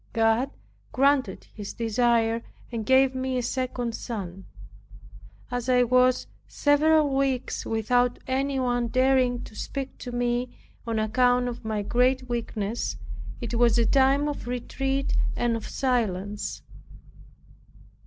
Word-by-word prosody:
God 225 +3 +2 0.4
granted 270 -6 +2
his 205 -2 -7
desire, 230 0 +1 0.3
and 225 -3 -4
gave 265 0 +5
me 260 0 -2
a 250 - -1
second 245 -1 -2
son. 195 -6 -6 1.0
As 245 0 -2
I 250 -1 +5
was 255 +1 +3 0.2
several 295 0 +3
weeks 270 -2 -1
without 245 +2 +1
any 270 +1 0
one 245 -2 0
daring 255 0 +2
to 215 - -11
speak 270 +4 -5
to 245 - -6
me, 245 0 -1 0.3
on 225 -1 -1
account 245 +3 +2
of 245 -1 -6
my 215 -2 -2
great 255 +4 +2
weakness, 225 - -3 0.4
it 235 0 -4
was 235 -1 +4
a 235 - +3
time 270 +4 +3
of 290 -5 -4
retreat 270 +2 -2 0.2
and 240 -1 +1
of 225 - -5
silence. 210 -6 -2
245 Hz, 125 wpm, -26 LUFS, 230-260 Hz, 1.0 s, gave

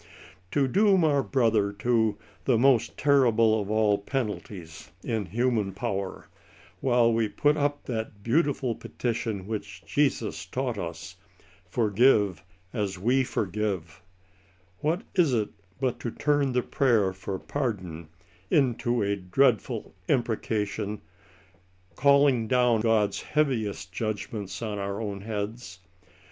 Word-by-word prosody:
To 140 +4 +2
doom 195 +3 +4
our 145 -3 +3
brother 115 -7 +2
to 110 0 +1
" - - -30
the 125 -4 +3
most 125 -1 +3
terrible 115 -6 +4
of 100 - -6
all 105 -2 +2
penalties" 100 - -5
in 110 -4 -2
human 110 0 0
power, 100 -3 -4 0.5
while 120 -3 +3
we 115 -1 +1
put 145 +9 +2
up 145 -1 -1
that 110 -4 -5
beautiful 135 -1 +1
petition 110 -4 -3
which 110 0 -6
Jesus - - 0
taught - - -2
us - - -6 0.2
— - - -28
«* - - -26
forgive, 105 -4 +3 0.3
as 100 -5 -2
we 125 +8 +2
forgive^*^ 105 -6 -3 0.4
— 90 0 -34
^what 165 +7 0
is 165 -9 +3
it 105 -2 0 0.3
but 130 -2 -1
to 120 - -3
turn 145 +1 +1
the 125 -1 +1
prayer 115 -10 +2
for 95 0 -5
pardon 95 - -4 0.4
into 120 -4 +2
a 100 0 +1
dreadful 110 +4 +1
imprecation, 105 -4 -1 1.0
calling 140 -4 +4
down 125 -2 +3
God's 110 -3 +2
heaviest 110 -10 -1
judgments 105 -1 -4
on 105 -2 -3
our 100 0 -3
own 100 -3 -4
heads? 105 0 -5
110 Hz, 130 wpm, -27 LUFS, 100-130 Hz, 1.0 s, doom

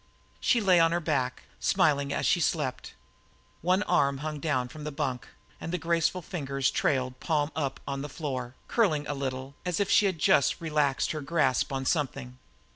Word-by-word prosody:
She 245 - +3
lay 185 -4 +5
on 165 0 +4
her 175 - +1
back, 140 -6 -1 0.2
smiling 145 -7 +2
as - - -1
she 175 - +3
slept. 150 -6 -1 0.7
One 185 +4 +2
arm 140 -8 +2
hung 155 -1 -3
down 140 -5 0
from 150 +4 -10
the 150 - -4
bunk 135 -4 -3 0.3
and 165 - -5
the 180 - 0
graceful 170 +2 0
fingers 135 -6 -1
trailed, 130 -2 0
palm 155 -2 0
up, 140 -4 -2
on 140 0 -3
the 145 - -5
floor, 130 -4 -4
curling 160 -11 +2
a 145 - -2
little, 135 -1 -4
as 180 -2 -1
if 200 -1 +1
she 205 - +5
had 185 -3 -1
just 140 -1 +3
relaxed 150 -5 +1
her 155 - -4
grasp 140 -4 +1
on 135 -1 -2
something. 135 -4 -2
150 Hz, 185 wpm, -28 LUFS, 135-170 Hz, 0.7 s, lay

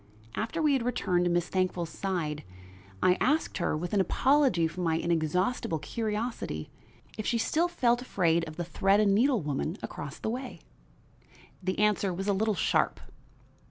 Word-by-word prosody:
After 225 +9 -2
we 300 -2 +4
had 265 - +2
returned 185 -7 0
to - - +2
Miss 175 0 +1
Thankful's 185 -3 -1
side, 160 -6 -3 0.6
I 180 0 +4
asked 295 -5 +1
her, 165 - 0
with 175 +5 -4
an 200 - +4
apology 255 - +3
for 165 +3 -6
my 165 -2 +1
inexhaustible 170 +3 0
curiosity, 215 - -3 0.5
if 215 - -2
she 235 - +2
still 320 +9 +1
felt 245 -8 +1
afraid 170 -8 +1
of 155 - -8
the 175 - -3
thread 195 +4 +2
and 205 -2 +4
needle 240 - +3
woman 150 +5 -2
across 145 0 -6
the 220 - -3
way. 255 +2 -6 1.0
The 185 0 -2
answer 210 -2 +2
was 190 +3 -4
a 200 - +3
little 215 +2 +1
sharp. - - +1
195 Hz, 165 wpm, -29 LUFS, 170-230 Hz, 1.0 s, we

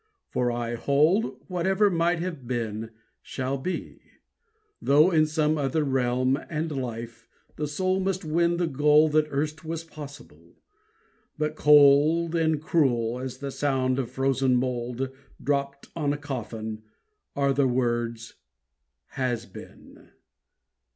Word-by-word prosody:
for 125 -1 0
I 120 0 -3
hold 150 - +2
Whatever 190 +3 +2
might 170 0 +1
have 165 -7 -5
been 115 -3 -3 0.3
shall 130 +1 -3
be. 180 +7 -5 0.8
Though 150 +6 +5
in 155 -2 +4
Some 155 0 +1
other 145 +3 0
realm 130 -1 +1
and 160 0 -2
life, 120 -4 -6 0.3
the 150 - -3
soul 185 +5 0
must 190 -1 -2
win 170 +2 +1
The 175 - +1
goal 150 +1 +4
that 150 0 +2
erst 150 +2 -2
was 165 0 -4
possible. 150 -3 -12 0.8
But 155 0 -1
cold 150 +3 +5
And 160 -2 +1
cruel 125 -7 +1
as 130 -1 -5
the 140 +1 -5
sound 130 -2 0
of 125 - -2
frozen 135 -1 +1
mould 125 +1 -2 0.3
Dropped 140 -1 -2
on 145 -3 0
a - - -3
coffin, 110 -6 -5 0.5
are 140 -1 +2
the 135 0 +2
words 120 -2 -1 0.8
"Has 120 -3 -2
been." 100 - -14
140 Hz, 130 wpm, -26 LUFS, 125-155 Hz, 0.8 s, Though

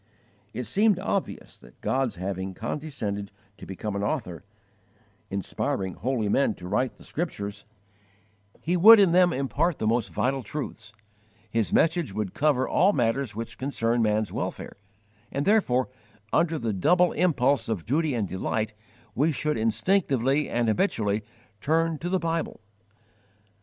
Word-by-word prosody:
It 125 - -4
seemed 200 - +2
obvious 195 0 -3
that - - -18
God's 130 -5 0
having 95 +1 -4
condescended 110 - -4 0.3
to - - -10
become 100 +2 -5
an 100 - -2
Author, 100 - -3 0.9
inspiring 95 -1 -2
holy 120 +1 -1
men 115 +1 +2
to 90 - -9
write 125 +7 0
the - - -17
Scriptures, 100 -11 -5 1.0
He 175 +3 0
would 215 +5 +9
in 195 -4 +5
them 180 0 +5
impart 145 +4 0
the - - -3
most 115 +1 +1
vital 135 +1 0
truths; 115 -3 -6 0.6
His 115 -2 0
message 165 - +2
would 105 -3 -3
cover 140 -4 +2
all 200 +3 +3
matters 120 -1 0
which 115 +1 -6
concern 120 -3 0
man's 110 -1 +1
welfare, - - -4 0.6
and 140 +1 -2
therefore, 160 - +3 0.5
under 165 -1 +2
the 115 -6 -2
double 175 - +3
impulse 140 -8 +1
of 100 -8 -2
duty 150 +2 +1
and 110 -4 -1
delight, 105 +4 -2 0.4
we 150 +8 +2
should 150 +1 -1
instinctively 135 - +1
and 120 -1 0
habitually 110 - +1 0.4
turn 160 +3 +1
to 175 - -3
the 190 - +2
Bible. 165 -2 -2
125 Hz, 140 wpm, -26 LUFS, 105-160 Hz, 1.0 s, would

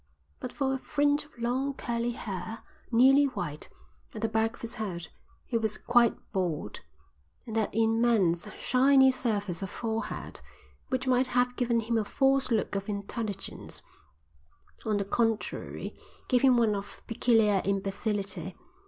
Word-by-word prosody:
But - - -5
for 270 -2 0
a 265 - -2
fringe 290 +1 +1
of 295 - -23
long 255 +4 -1
curly 235 -1 -2
hair, 205 +1 -6 0.3
nearly 265 +4 +6
white, 170 - -4 0.5
at 215 - -5
the - - +3
back 220 0 0
of - - -18
his 230 0 -5
head, 185 -7 -5 0.4
he 230 - 0
was 220 -1 -1
quite 240 -1 +3
bald; 170 - -2 0.7
and 225 - -6
that 220 -2 +1
immense, 225 -5 +2
shiny 265 +1 +5
surface 205 -8 -2
of 195 - -3
forehead, 225 +1 -4 0.5
which 260 0 -1
might 255 0 +3
have 250 0 +1
given 235 -2 +1
him 230 +1 0
a - - 0
false 270 +5 +2
look 225 -4 0
of 195 +1 -3
intelligence, 205 +1 -5 1.0
on 215 -1 +2
the 200 - -1
contrary 225 +1 -1 0.3
gave 250 -2 +3
him 260 -2 +5
one 225 -3 +3
of 200 0 -6
peculiar 225 -4 +3
imbecility. 200 0 -2
225 Hz, 145 wpm, -29 LUFS, 205-250 Hz, 1.0 s, nearly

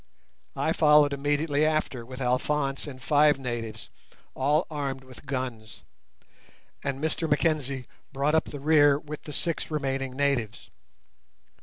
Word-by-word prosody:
I 160 - +1
followed 150 -2 +5
immediately 145 +1 0
after 155 -5 0
with 130 +2 -9
Alphonse 135 +3 0
and 130 -3 -8
five 150 +1 +4
natives 120 -4 -5 0.4
all 145 +5 +2
armed 135 -3 -3
with 130 +2 -14
guns, 125 -5 -5 1.0
and 140 -1 -2
Mr 160 +1 -1
Mackenzie 145 -4 0 0.3
brought 140 +2 0
up 160 - +3
the 145 - -7
rear 145 -1 +5
with 150 0 -8
the 150 - -7
six 170 +1 -2
remaining 135 -3 -2
natives. 135 -7 -1
140 Hz, 130 wpm, -27 LUFS, 130-150 Hz, 1.0 s, followed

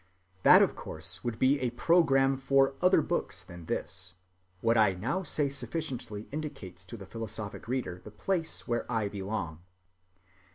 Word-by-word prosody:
That - - +8
of - - 0
course - - -7
would 120 -2 -2
be 135 +4 +3
a 125 - 0
program 135 0 +4
for 135 0 +3
other 180 -3 +5
books - - -2
than 85 -1 -11
this; 90 0 -3 0.5
what 115 +4 +2
I 105 -4 +5
now 135 - -1
say 150 -5 0
sufficiently 125 -5 -4
indicates 125 - -6
to 105 +6 -8
the 100 - -9
philosophic 110 0 -6
reader 115 -8 -2
the - - -9
place 165 - -2
where 120 0 -1
I 110 -3 0
belong. 95 -5 -4
120 Hz, 155 wpm, -30 LUFS, 100-135 Hz, 0.5 s, That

